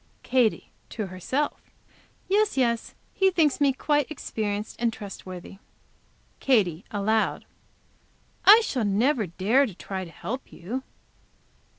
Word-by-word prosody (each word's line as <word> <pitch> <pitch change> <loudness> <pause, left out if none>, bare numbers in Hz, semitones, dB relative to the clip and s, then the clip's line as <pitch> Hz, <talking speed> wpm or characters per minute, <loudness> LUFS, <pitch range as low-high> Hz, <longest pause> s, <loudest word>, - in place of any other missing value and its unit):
Katy, 250 -4 +1 0.2
to 215 - -4
herself. 195 +11 -2 0.7
"Yes, 415 -2 +2
yes, 235 -3 0 0.2
he 385 -1 +3
thinks 315 -6 +2
me 280 -1 +5
quite 290 +1 0
experienced 215 -7 -4
and 235 0 +1
trustworthy." 195 -3 -9 0.8
Katy, 195 - +2
aloud. 215 +2 0 1.0
"I 430 +3 +9
shall 260 - -1
never 215 +3 +2
dare 215 +11 +2
to 200 - -9
try 190 0 -5
to 175 - -9
help 225 +11 -6
you." 225 +10 -5
225 Hz, 115 wpm, -26 LUFS, 195-275 Hz, 1.0 s, I